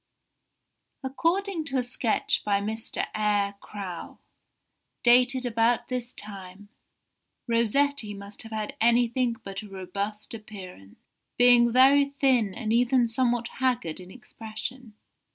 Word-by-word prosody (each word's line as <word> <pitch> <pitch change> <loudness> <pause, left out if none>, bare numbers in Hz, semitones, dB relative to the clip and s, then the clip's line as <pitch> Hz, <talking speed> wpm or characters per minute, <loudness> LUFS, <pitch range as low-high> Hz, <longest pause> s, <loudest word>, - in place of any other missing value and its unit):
] - - -52
"According 335 +6 0
to 270 -2 -2
a 250 - +1
sketch 245 -2 0
by 200 -1 +1
Mr. 220 +2 -2
Eyre 205 -2 +1
Crowe, 190 -5 -7 0.9
dated 250 +1 +5
about 230 0 +1
this 250 -1 -4
time, 200 -1 -9 0.8
Rossetti 235 0 +1
must 200 +1 -7
have 225 - -11
had 215 -1 -4
anything 235 +1 +3
but 195 +1 -6
a 210 - -11
robust 200 +3 -5
appearance, 190 - -11 0.4
being 245 -1 +6
very 270 +3 +6
thin 250 -7 +3
and 220 -1 -2
even 245 +1 +3
somewhat 240 0 +1
haggard 245 -12 0
in 180 0 -11
expression. 225 +1 -8
230 Hz, 120 wpm, -27 LUFS, 205-250 Hz, 0.9 s, being